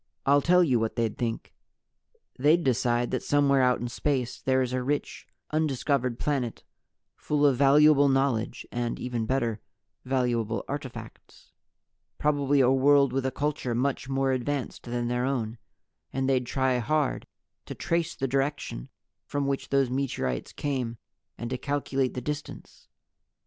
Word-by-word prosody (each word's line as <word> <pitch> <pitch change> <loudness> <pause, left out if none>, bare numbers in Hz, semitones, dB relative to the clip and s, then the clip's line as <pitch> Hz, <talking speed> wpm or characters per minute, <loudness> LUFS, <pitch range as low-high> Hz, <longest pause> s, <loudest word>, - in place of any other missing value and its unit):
"I'll 140 +1 +5
tell 180 +4 +5
you 130 -8 +2
what 110 0 -2
they'd 115 -3 -1
Think. 115 -2 -4 0.9
They'd 155 +6 +4
decide 120 -1 +1
that - - -1
somewhere 140 -2 +3
out 125 -1 +3
in 120 - -2
space 130 0 -2
there 130 0 +2
is 125 0 -3
a 130 - 0
rich, 145 +3 -3 0.2
undiscovered 140 -5 0
planet 130 -6 -2 0.5
full 150 -1 0
of 140 -2 +5
valuable 145 +1 +6
knowledge 135 -4 0
and, 120 -1 -2
even 120 -3 -3
better, 115 -4 0 0.4
valuable 120 -4 -1
artifacts. 140 -3 -8 0.7
Probably 145 -2 +2
a 130 0 +4
world 140 0 +4
with 135 0 0
a - - -1
culture 140 -3 -2
much 130 +1 -1
more 135 0 +1
advanced 130 +1 -3
than 120 0 -2
their 125 +1 0
own. 120 -4 -2 0.5
And 135 0 -1
they'd 130 -2 +1
try 130 -1 +1
hard 150 +3 0 0.4
to - - -6
trace 170 -1 -1
the 135 - -2
direction 135 - -2 0.4
from 145 -1 -1
which 140 0 -2
those 135 -2 +2
meteorites 125 - -2
came, 130 -5 -3 0.4
and 120 - -5
to 130 - -2
calculate 135 -2 -1
the 125 - -3
distance. 150 +3 -7
135 Hz, 150 wpm, -27 LUFS, 120-145 Hz, 0.9 s, valuable